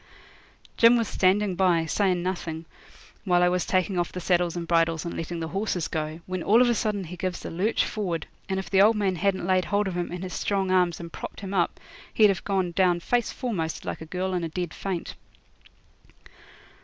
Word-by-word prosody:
Jim 235 +1 +7
was 230 -2 0
standing 195 +1 +2
by, 175 -3 +2
sayin' 180 +1 +1
nothing, 170 -3 -4 0.6
while 180 -2 +3
I 180 - +5
was 180 -1 -1
taking 185 0 +1
off 175 - -1
the 180 - -5
saddles 175 -1 +1
and 170 -1 -4
bridles 165 -1 +2
and 170 - -4
letting 165 +1 -4
the 160 - -3
horses 195 -3 -1
go, 155 +1 -4
when 185 -1 -4
all 215 +7 +4
of 250 - +5
a 240 - +3
sudden 210 -3 -1
he 180 +1 -8
gives 185 0 -4
a - - -5
lurch 195 +7 +1
forward, 180 -6 -3 0.2
and 190 - 0
if 190 - -6
the 195 -1 +4
old 220 +3 +6
man 195 -3 0
hadn't 190 0 0
laid 185 0 +2
hold 205 +1 +1
of 185 - -3
him 175 -1 -2
in 180 +1 -5
his 185 -2 -5
strong 195 -2 -1
arms 180 -3 +2
and 170 -1 -8
propped - - -7
him 195 -1 -5
up 175 -3 0 0.4
he'd 215 -2 +6
have 195 - -1
gone 190 -3 0
down 175 -1 +2
face 240 +6 0
foremost 180 -11 -3
like - - -4
a 160 - -8
girl 185 +3 -2
in 180 -1 -1
a 165 - -2
dead 175 0 -4
faint. 185 -4 -4
185 Hz, 215 wpm, -26 LUFS, 170-195 Hz, 0.6 s, Jim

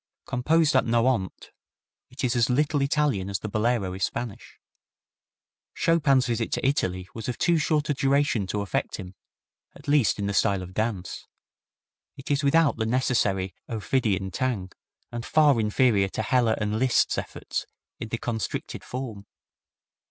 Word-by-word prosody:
Composed 150 +4 +2
at 130 - +5
Nohant, 115 -4 0 0.6
it - - -8
is 125 -1 +1
as 120 0 +2
little 145 +3 +1
Italian 140 -9 +1
as 100 - -1
the 110 - -6
Bolero 110 -2 0
is 95 0 -4
Spanish. 120 0 -5 1.2
Chopin's 145 -6 +3
visit 115 -1 -1
to - - 0
Italy 95 -9 -1
was 115 +2 -5
of 125 - -3
too 170 -2 +2
short 155 -1 +1
a 145 - +1
duration 135 -6 +1
to 100 +3 -2
affect 100 - -2
him, 90 -1 -8 0.6
at - - -15
least 145 -5 +3
in 100 - -2
the 100 - -1
style 100 -1 +2
of 90 0 -10
dance. 105 -3 -3 0.9
It 135 +2 -6
is 140 +1 +1
without 145 0 +3
the 110 -1 -1
necessary 105 -7 +1 0.2
ophidian 105 -3 -1
tang, 115 -8 -2 0.4
and 120 -1 -5
far 145 -3 +4
inferior 105 -2 +2
to - - -2
Heller 120 -4 +2
and 105 0 -1
Liszt's 130 0 +2
efforts - - -5 0.3
in 115 - -5
the 115 - -2
constricted 115 -2 -4
form. 115 -6 -6
120 Hz, 155 wpm, -26 LUFS, 100-135 Hz, 1.2 s, at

